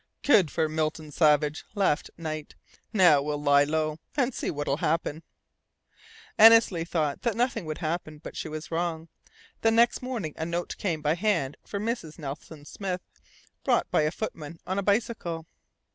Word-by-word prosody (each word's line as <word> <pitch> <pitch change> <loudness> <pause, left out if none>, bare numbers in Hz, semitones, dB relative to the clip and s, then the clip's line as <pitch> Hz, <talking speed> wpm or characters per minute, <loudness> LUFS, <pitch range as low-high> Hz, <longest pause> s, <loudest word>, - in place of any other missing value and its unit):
"Good 195 - +5
for 160 - 0
Milton 155 0 -2
Savage," 150 -1 +3
laughed 190 -7 +1
Knight. 155 -2 -5 0.4
"Now 175 -9 +6
we'll 145 +1 -2
lie 145 -1 +4
low, 155 +1 -1 0.2
and 260 -2 +2
see - - -3
what 145 -1 -3
will 140 - +1
happen." 160 -1 -1 1.2
Annesley 220 -6 +7
thought 155 -4 -1
that 235 -4 0
nothing 240 -6 0
would 155 -1 -4
happen; 155 -2 -3
but 150 - -10
she - - -4
was 155 +1 -7
wrong. 165 -1 -2 0.5
The 225 - +4
next 230 +1 +3
morning 235 - -4
a 160 - -3
note 170 +1 -3
came 165 -6 -2
by 150 +1 +3
hand 170 -7 0
for 200 - -5
Mrs. 215 -8 -3
Nelson 145 0 -8
Smith, 185 +1 -4 0.6
brought - - +1
by - - +3
a 150 - +2
footman 165 -4 -6
on 190 +2 -1
a - - -2
bicycle. 200 -6 -1
160 Hz, 165 wpm, -27 LUFS, 150-200 Hz, 1.2 s, Annesley